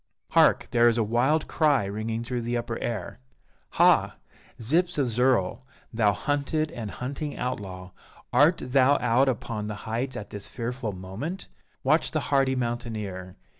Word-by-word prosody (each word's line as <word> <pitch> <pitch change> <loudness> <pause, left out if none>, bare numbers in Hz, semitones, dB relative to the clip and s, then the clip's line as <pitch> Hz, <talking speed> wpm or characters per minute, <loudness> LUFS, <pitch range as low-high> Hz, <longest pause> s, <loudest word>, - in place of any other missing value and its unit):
Hark! - - +4
there 120 0 +5
is 115 - 0
a 115 - +3
wild 125 +8 +1
cry 145 -9 +2
ringing 110 +3 -3
through 125 0 -3
the 120 +1 -1
upper 120 -1 -4
air! 110 -7 -4 0.6
Ha! - - +4 0.4
Zyps 165 +10 +1
of 135 -4 +1
Zirl, 120 -3 +2 0.3
thou 110 -2 +3
hunted 145 - -1
and 115 -8 -6
hunting 140 +6 -5
outlaw, 95 -7 -5 0.4
art 150 +7 +4
thou 135 +2 +4
out 125 +3 +3
upon 110 -3 -3
the 105 - -4
heights 120 +4 -2
at 105 - -7
this 105 -1 -4
fearful 120 -1 -4
moment? 100 - -6 0.3
Watch - - +3
the - - -1
hardy 135 -1 +3
mountaineer! 110 -7 -4
120 Hz, 150 wpm, -26 LUFS, 110-135 Hz, 0.6 s, there